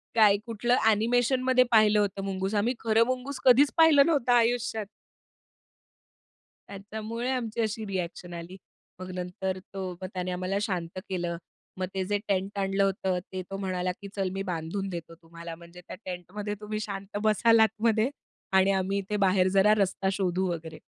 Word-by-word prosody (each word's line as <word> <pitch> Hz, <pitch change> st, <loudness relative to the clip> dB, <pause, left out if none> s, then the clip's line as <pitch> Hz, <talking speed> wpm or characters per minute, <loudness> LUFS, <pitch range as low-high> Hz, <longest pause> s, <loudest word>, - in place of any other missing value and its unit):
काय 210 Hz, -3 st, +6 dB
कुठलं 235 Hz, +1 st, +1 dB
अ‍ॅनिमेशनमध्ये 245 Hz, +4 st, +3 dB
पाहिलं 215 Hz, -2 st, +5 dB
होतं, 195 Hz, -1 st, -1 dB
मुंगूस. 190 Hz, +1 st, -2 dB
आम्ही 225 Hz, +5 st, +2 dB
खरं 225 Hz, 0 st, +3 dB
मुंगूस 255 Hz, +2 st, -3 dB
कधीच 265 Hz, +3 st, +6 dB
पाहिलं 315 Hz, -4 st, +7 dB
नव्हता 280 Hz, -7 st, +2 dB
आयुष्यात. 230 Hz, -2 st, +1 dB, 1.8 s
त्याच्यामुळे 220 Hz, +4 st, -5 dB
आमची 235 Hz, -3 st, -2 dB
अशी 220 Hz, 0 st, -2 dB
रिएक्शन 180 Hz, -2 st, -5 dB
आली. 170 Hz, +2 st, -8 dB, 0.4 s
मग 185 Hz, 0 st, -7 dB
नंतर 185 Hz, +1 st, -3 dB
तो, 190 Hz, -1 st, -4 dB
मग 185 Hz, -, -4 dB
त्याने 180 Hz, -1 st, -3 dB
आम्हाला 185 Hz, +2 st, -2 dB
शांत 185 Hz, -3 st, -3 dB
केलं, 175 Hz, -2 st, -2 dB, 0.4 s
मग 185 Hz, -, -1 dB
ते 190 Hz, -1 st, -1 dB
जे 205 Hz, +2 st, 0 dB
टेंट 195 Hz, 0 st, -1 dB
आणलं 195 Hz, 0 st, +1 dB
होतं, 190 Hz, -1 st, 0 dB
ते 185 Hz, -, -3 dB
तो 195 Hz, -, -4 dB
म्हणाला, 185 Hz, -2 st, -2 dB
की 200 Hz, -, -7 dB
चल, 195 Hz, -2 st, -1 dB
मी 195 Hz, 0 st, -3 dB
बांधून 180 Hz, +2 st, -3 dB
देतो 170 Hz, -2 st, -7 dB
तुम्हाला, 170 Hz, 0 st, -9 dB
म्हणजे 170 Hz, +1 st, -14 dB
त्या -, -, -7 dB
टेंटमध्ये 190 Hz, +3 st, -5 dB
तुम्ही 215 Hz, 0 st, -4 dB
शांत 200 Hz, -1 st, -5 dB
बसला 220 Hz, +1 st, +5 dB
आतमध्ये. 220 Hz, +2 st, +1 dB, 0.4 s
आणि 190 Hz, +1 st, +5 dB
आम्ही 195 Hz, +1 st, 0 dB
इथे 200 Hz, +2 st, -2 dB
बाहेर 185 Hz, -1 st, +4 dB
जरा 205 Hz, +2 st, +6 dB
रस्ता 195 Hz, -1 st, 0 dB
शोधू 190 Hz, -1 st, 0 dB
वगैरे. 160 Hz, -2 st, -6 dB
195 Hz, 160 wpm, -28 LUFS, 185-220 Hz, 1.8 s, पाहिलं